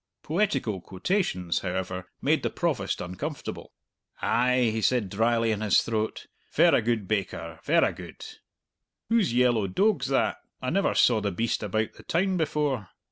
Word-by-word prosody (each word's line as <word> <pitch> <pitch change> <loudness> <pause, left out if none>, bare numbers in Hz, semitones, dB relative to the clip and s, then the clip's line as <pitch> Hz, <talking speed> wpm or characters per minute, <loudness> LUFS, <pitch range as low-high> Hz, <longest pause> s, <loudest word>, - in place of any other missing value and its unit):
'" - - -60
Poetical 160 - 0
quotations, 95 - -1
however, 95 0 -4 0.2
made - - +3
the - - -1
Provost - - -1
uncomfortable. 135 - -6 0.5
"Ay," 125 -1 +2
he 110 - -1
said 110 -5 +1
dryly 115 +2 +2
in 105 -1 -2
his 105 -2 +4
throat; 110 -1 -2 0.3
"verra - - +5
good, 110 -3 -1
baker, 85 -6 -3
verra - - +3
good! - - -10 0.8
Who's 230 - +3
yellow 120 -4 +3
doag's 200 - +1
that? 135 0 +1 0.2
I 130 0 -2
never 195 - +1
saw 115 -3 +4
the 105 - 0
beast 115 +6 -1
about 110 +1 -1
the - - -14
town 185 +3 0
before!" 145 - -1
115 Hz, 150 wpm, -27 LUFS, 100-140 Hz, 0.8 s, verra